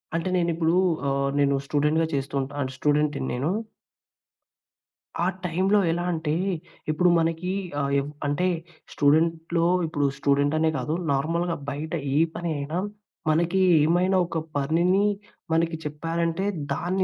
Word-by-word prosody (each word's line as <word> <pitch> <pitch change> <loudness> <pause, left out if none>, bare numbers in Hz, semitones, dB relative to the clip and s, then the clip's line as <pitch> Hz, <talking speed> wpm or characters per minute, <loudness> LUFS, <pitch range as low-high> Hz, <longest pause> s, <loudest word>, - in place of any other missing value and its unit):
అంటే 170 +3 -1
నేను 170 -1 +1
ఇప్పుడు 165 0 +1 0.4
ఆహ్, 140 0 0
నేను 140 -1 +3
స్టూడెంట్‌గా 150 +3 +2
చేస్తూ 140 0 -2
ఉంటా 135 +2 -6
అంటే, 130 -1 -3
స్టూడెంట్‌ని 150 -2 +1
నేను. 130 +5 -1 1.7
ఆ - - +2 0.2
టైమ్‌లో 190 +4 +2
ఎలా 175 +1 -1
అంటే, 160 -2 -1 0.6
ఇప్పుడు 180 +4 +3
మనకి 165 +2 -1 0.3
ఆహ్, 140 0 -1
ఎవ్ 140 - -4 0.2
అంటే 145 +6 +1 0.5
స్టూడెంట్‌లో, 165 +3 +2 0.2
ఇప్పుడు 145 -3 -1
స్టూడెంట్ 140 +1 +2
అనే 160 0 +3
కాదు. 155 - -2 0.2
నార్మల్‌గా 165 +5 0
బయట 150 +3 -5 0.2
ఏ - - +3 0.2
పని 170 0 -3
అయినా, 145 +4 -3 0.5
మనకి 170 +4 +2 0.2
ఏమైనా 180 +4 +3
ఒక 170 -1 -4 0.2
పనిని 170 +8 +2 0.5
మనకి 165 0 +1
చెప్పారంటే, 165 +4 -2 0.3
దాన్ని 185 +3 0
160 Hz, 130 wpm, -25 LUFS, 145-170 Hz, 1.7 s, నేను